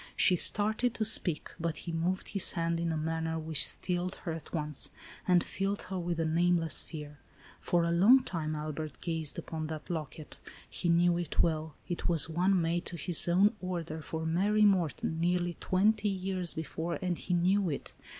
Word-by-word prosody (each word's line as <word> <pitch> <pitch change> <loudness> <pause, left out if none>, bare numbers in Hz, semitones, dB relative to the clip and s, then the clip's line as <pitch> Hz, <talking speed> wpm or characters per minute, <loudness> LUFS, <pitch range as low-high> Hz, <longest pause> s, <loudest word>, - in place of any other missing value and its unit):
She 180 - +5
started 215 +6 +3
to 215 - 0
speak, 180 -7 +1
but 165 -1 -2
he 170 - -3
moved 170 +3 -1
his 200 - +2
hand 165 0 0
in 170 0 -1
a 160 - -1
manner 160 +1 -2
which 160 -2 +2
stilled 180 0 -2
her 170 - -1
at 160 -2 -7
once, 150 -3 -2 0.4
and 180 -2 +5
filled 195 +1 -2
her 190 0 -4
with 170 -1 -2
a 165 - +1
nameless 165 -1 +1
fear. 150 -2 -9 0.4
For 175 -1 +1
a 170 - +1
long 220 +10 +6
time, 155 -6 -3
Albert 150 -3 -5
gazed 160 -3 -1
upon 160 -1 -4
that 155 +3 -6
locket. 155 -2 -6 0.3
He 175 - -3
knew 170 +1 +4
it 175 - 0
well. 160 -2 -1
It 175 - -2
was 165 -3 +3
one 180 +4 +2
made 170 +1 -1
to 170 - -5
his 170 +2 0
own 195 +5 +4
order, 170 -4 -4
for 160 +1 -4
Mary 205 +6 +3
Morton, 165 - +1
nearly 175 0 +1
twenty 205 +3 +2
years 185 -2 -2
before, 160 +2 -3
and 180 -2 -1
he 180 +1 -2
knew 185 +2 +2
it. 140 - -5
170 Hz, 185 wpm, -31 LUFS, 160-185 Hz, 0.4 s, long